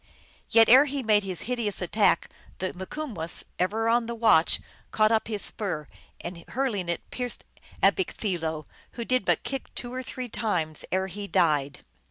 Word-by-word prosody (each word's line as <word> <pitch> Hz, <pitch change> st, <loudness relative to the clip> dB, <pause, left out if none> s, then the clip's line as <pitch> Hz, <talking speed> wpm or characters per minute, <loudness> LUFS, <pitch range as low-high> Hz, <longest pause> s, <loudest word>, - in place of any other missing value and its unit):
Yet 225 Hz, -1 st, +6 dB
ere 260 Hz, +5 st, +8 dB
he 280 Hz, -1 st, -3 dB
made 215 Hz, -2 st, +4 dB
his 185 Hz, -4 st, -5 dB
hideous 235 Hz, -5 st, -1 dB
attack 190 Hz, 0 st, +2 dB, 0.3 s
the 185 Hz, -, -3 dB
Mikumwess, 190 Hz, -, -4 dB, 0.2 s
ever 220 Hz, +5 st, +1 dB
on 230 Hz, 0 st, +2 dB
the 235 Hz, -, -4 dB
watch, 220 Hz, -8 st, +4 dB, 0.3 s
caught 215 Hz, 0 st, +3 dB
up 220 Hz, -1 st, +2 dB
his 210 Hz, -3 st, -1 dB
spear, 175 Hz, -8 st, -2 dB, 0.3 s
and, 170 Hz, -1 st, -7 dB
hurling 230 Hz, -9 st, -1 dB
it, 170 Hz, -, -3 dB
pierced 250 Hz, -1 st, -3 dB, 0.4 s
A -, -, +8 dB
bekk 380 Hz, -2 st, -4 dB
thee 200 Hz, -4 st, 0 dB
lo, 160 Hz, -2 st, -3 dB, 0.3 s
who 235 Hz, -, -5 dB
did 255 Hz, +1 st, +1 dB
but -, -, +2 dB
kick 270 Hz, 0 st, -4 dB
two 245 Hz, -1 st, -5 dB
or 255 Hz, -, -3 dB
three 255 Hz, 0 st, -5 dB
times 175 Hz, -10 st, -1 dB
ere 190 Hz, +1 st, +1 dB
he 200 Hz, +2 st, -6 dB
died. 150 Hz, -8 st, +1 dB
210 Hz, 180 wpm, -27 LUFS, 180-240 Hz, 0.4 s, ere